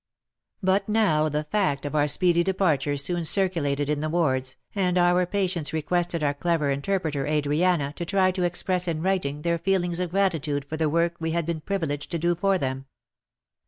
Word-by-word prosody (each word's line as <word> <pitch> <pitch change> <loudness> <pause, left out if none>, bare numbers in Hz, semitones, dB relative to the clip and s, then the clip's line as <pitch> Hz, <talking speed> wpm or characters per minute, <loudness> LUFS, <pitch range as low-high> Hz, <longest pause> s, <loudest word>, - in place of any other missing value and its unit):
But 195 +2 +1
now 160 -9 +2
the 150 +1 -1
fact 150 -5 -1
of 145 - -4
our 150 -1 +2
speedy 170 +3 +2
departure 155 -7 +1
soon 170 +5 -1
circulated 160 -6 +1
in 150 0 0
the 155 - -2
wards, 130 -6 0 0.2
and 185 -3 +1
our 175 0 +3
patients 180 -5 -1
requested 170 +1 -1
our 145 -1 +1
clever 155 -1 0
interpreter 145 -1 -1
Adriana 150 0 +1
to - - -3
try 190 +1 +2
to 185 0 -4
express 180 +1 0
in 160 -1 -2
writing 165 -6 -1
their 170 0 0
feelings 175 -1 0
of 180 -1 -1
grati 190 -3 +1
tude 145 -1 -3
for 155 - -5
the 160 -1 0
work 170 +2 +1
we 160 0 -2
had 170 -1 0
been 165 -1 -3
privileged 155 -6 -3
to 170 - -2
do 170 +2 +1
for 195 +3 +1
them. 135 -3 -4
170 Hz, 190 wpm, -25 LUFS, 150-180 Hz, 0.2 s, our